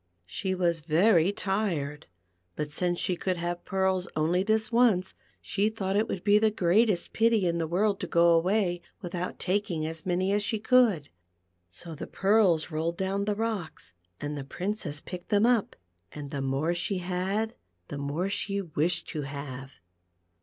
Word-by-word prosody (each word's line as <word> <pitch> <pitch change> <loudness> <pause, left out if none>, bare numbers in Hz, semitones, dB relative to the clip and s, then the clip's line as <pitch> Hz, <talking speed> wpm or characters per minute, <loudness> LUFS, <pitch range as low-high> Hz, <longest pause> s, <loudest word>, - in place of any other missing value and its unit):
She 190 - -3
was 170 -2 +1
very 170 +3 +3
tired, 175 -8 -2 0.5
but 150 -1 -4
since 175 +3 0
she 180 - -1
could 185 +1 -2
have 175 +1 -3
pearls 190 -1 0
only 165 +4 +2
this 220 +3 +1
once, 230 -6 +3 0.3
she 205 +2 +1
thought 195 -3 -3
it 215 +2 +2
would 180 - -4
be 205 0 +5
the 220 0 +4
greatest 205 0 +2
pity 225 -3 +3
in 170 -1 0
the 165 - -1
world 195 +4 +1
to - - -4
^o 170 0 +5
away 175 0 +1 0.2
without 175 0 -4
taking 185 -4 -1
as 160 0 -5
many 185 +2 0
as 205 - +2
she 220 +2 0
could. 215 - +3 0.6
So 165 - -8
the 150 - -7
pearls 190 -6 +2
rolled 165 +2 -2
down 195 +1 -1
the 210 0 0
rocks, 210 - -4 0.3
and 145 0 -4
the 140 - -5
Princess 170 0 -3
picked 180 -1 -8
them 205 +1 +4
up, 240 -4 +2 0.4
and 145 -2 -8
the 140 - -3
more 135 +5 0
she 175 +3 -1
had, 190 +5 -1 0.4
the 145 - -5
more 145 +6 -2
she 200 0 -2
wished 170 -1 -1
to 155 - -3
have. 135 -1 -7
180 Hz, 170 wpm, -28 LUFS, 160-205 Hz, 0.6 s, be